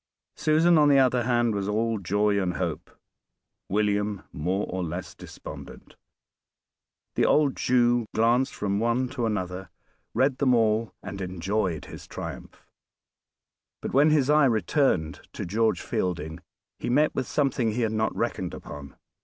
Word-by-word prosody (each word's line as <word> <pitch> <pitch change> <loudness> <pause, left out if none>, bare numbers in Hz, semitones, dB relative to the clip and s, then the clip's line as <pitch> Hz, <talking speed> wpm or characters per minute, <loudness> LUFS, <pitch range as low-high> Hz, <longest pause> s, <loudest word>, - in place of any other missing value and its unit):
Susan, 160 +2 +4
on 150 -1 +5
the 140 - +6
other 125 -3 +3
hand, 120 -2 +2
was 100 -1 -2
all 110 +1 0
joy 100 +2 +1
and 90 -1 -1
hope; 85 -4 -3 0.8
William 105 0 0
more 90 +5 -1
or 95 0 -3
less 85 +2 -5
despondent. - - -11 1.2
The - - +2
old 150 -3 +3
Jew 120 -2 +2
glanced 120 +4 +2
from 100 -1 -1
one 120 +3 +1
to 125 -4 -2
another, 95 -3 -3 0.5
read 135 0 +2
them 130 -3 +4
all, 110 0 +2
and 95 0 -6
enjoyed 95 -2 -2
his - - -10
triumph. - - -8 1.1
But - - -5
when 145 +4 +5
his 150 -4 +3
eye 150 0 +5
returned 110 - +1
to - - -5
George 105 0 +1
Fielding 80 -3 -3 0.4
he - - -3
met 150 +5 +3
with 130 - -2
something 130 -6 0
he 120 - -1
had 110 -2 +1
not 110 0 0
reckoned - - -2
upon. 70 -1 -10
110 Hz, 145 wpm, -26 LUFS, 95-125 Hz, 1.2 s, the